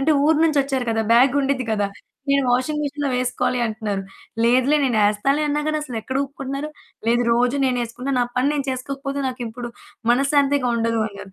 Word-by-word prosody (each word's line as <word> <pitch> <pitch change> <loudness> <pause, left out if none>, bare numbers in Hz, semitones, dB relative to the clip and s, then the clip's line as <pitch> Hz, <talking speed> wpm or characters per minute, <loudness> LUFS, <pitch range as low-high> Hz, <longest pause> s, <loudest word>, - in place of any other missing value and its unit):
అంటే 305 +3 +3
ఊరు 315 +1 +4
నుంచోచ్చారు 275 -5 +1
కదా! 225 0 +1
బ్యాగుండిద్ది 270 +1 +3
కదా! 205 -2 +1 0.4
"నేను 280 0 +3
వాషింగ్ 300 +5 0
మెషిన్‌లో 285 0 -2
వేసుకోవాలి" 250 0 0
అంటున్నారు, 215 -3 -3 0.4
"లేదులే 260 +5 +4
నేను 245 -5 +1
ఎస్తాలే" 270 +9 +1
అన్నా 295 +1 0
గాని 305 0 0
అసలు 250 -5 -6
ఎక్కడ 260 +4 -3
ఊపుకుంటున్నారు, 275 +1 -5 0.4
"లేదు 240 +1 +3
రోజు 245 +4 +2
నేను 250 -2 +1
ఏసుకున్న 250 +4 -5
నా - - +3
పని 255 +3 +2
నేను 280 -2 -2
చేసుకోకపోతే 275 +2 -4
నాకిప్పుడు 240 -1 -6 0.4
మనశాంతిగా 275 0 +2
ఉండదు" 230 0 0
అన్నారు. 200 -1 -11
260 Hz, 165 wpm, -22 LUFS, 240-280 Hz, 0.4 s, ఊరు